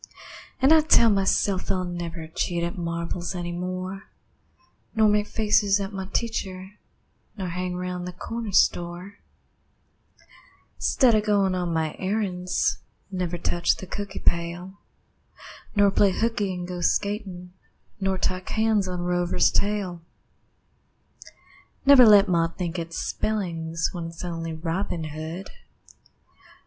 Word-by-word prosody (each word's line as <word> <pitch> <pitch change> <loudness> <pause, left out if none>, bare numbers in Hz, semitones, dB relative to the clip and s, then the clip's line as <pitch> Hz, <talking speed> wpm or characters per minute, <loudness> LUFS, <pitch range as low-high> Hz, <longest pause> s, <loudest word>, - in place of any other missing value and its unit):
An' 270 +3 +4
I 320 -1 +8
tell 235 -7 +5
myself 195 -1 +1
I'll 185 -1 0
never 175 -2 -5
Cheat 170 +2 -2
at 170 - -2
marbles 170 +1 -3
any 175 -1 -4
more, 185 +2 -4 0.9
Nor 220 -1 +5
make 210 0 +2
faces 210 -2 +2
at 195 +1 -4
my 190 -1 -5
teacher, 190 -5 -3 0.7
Nor 185 -3 -3
hang 180 +1 -3
round 180 0 -4
the - - -4
corner 225 +4 -5
store 180 +1 +1 1.6
'Stead 255 -4 +4
of 215 -1 +3
goin' 200 -3 +2
on 180 -2 -1
my 160 -2 -1
errands; 185 -2 -1 0.3
Never 180 -2 -2
touch 175 0 +1
the - - -8
cookie 200 +1 -6
pail, 175 +3 -1 1.0
Nor 205 -1 +5
play 200 0 +4
hooky 220 -3 0
an' 180 -1 -4
go 180 0 -5
skatin', 190 -2 -1 0.5
Nor 195 -1 0
tie 185 0 -1
cans 215 +1 +1
on 180 -1 -3
Rover's 175 0 +2
tail; 200 -4 -1 1.8
Never 270 -4 +9
let 205 -1 +7
ma 170 -2 +2
think 175 +1 -4
it's 165 0 -5
spellings 165 -6 -2
When 170 -2 -5
it's 165 +2 -8
only 165 -1 -4
Robin 165 +1 -3
Hood. 160 +5 -6
185 Hz, 130 wpm, -25 LUFS, 175-205 Hz, 1.8 s, Never